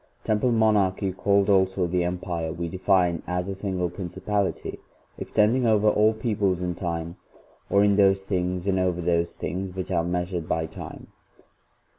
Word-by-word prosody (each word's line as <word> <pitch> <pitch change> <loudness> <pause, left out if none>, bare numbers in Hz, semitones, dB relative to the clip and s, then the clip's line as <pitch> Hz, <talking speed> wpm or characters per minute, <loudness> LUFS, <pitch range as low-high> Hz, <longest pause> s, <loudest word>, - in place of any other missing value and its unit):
Temporal 110 +3 +1
Monarchy, 105 -3 +2
called 100 +1 +2
also 95 -2 +3
the 90 +1 0
Empire, 85 -2 -3
we 85 +1 -4
define 90 -1 +1
as 90 +1 -2
a 100 - -3
single 95 -2 -2
Principality 100 +3 -3 0.4
extending 115 +4 +2
over 110 -1 +3
all 105 +1 +3
peoples 105 -5 -1
in 90 -1 -1
time, 85 -1 -4 0.5
or 100 0 +4
in 100 -1 +3
those 95 -1 +4
things 90 -2 -2
and 95 -1 +1
over 90 -1 0
those 85 0 0
things 95 +1 -4
which 95 0 -4
are 85 -2 +1
mea 90 +1 -1
sured 85 -3 -5
by 80 0 0
time.' 80 - -9
95 Hz, 160 wpm, -25 LUFS, 90-100 Hz, 0.5 s, or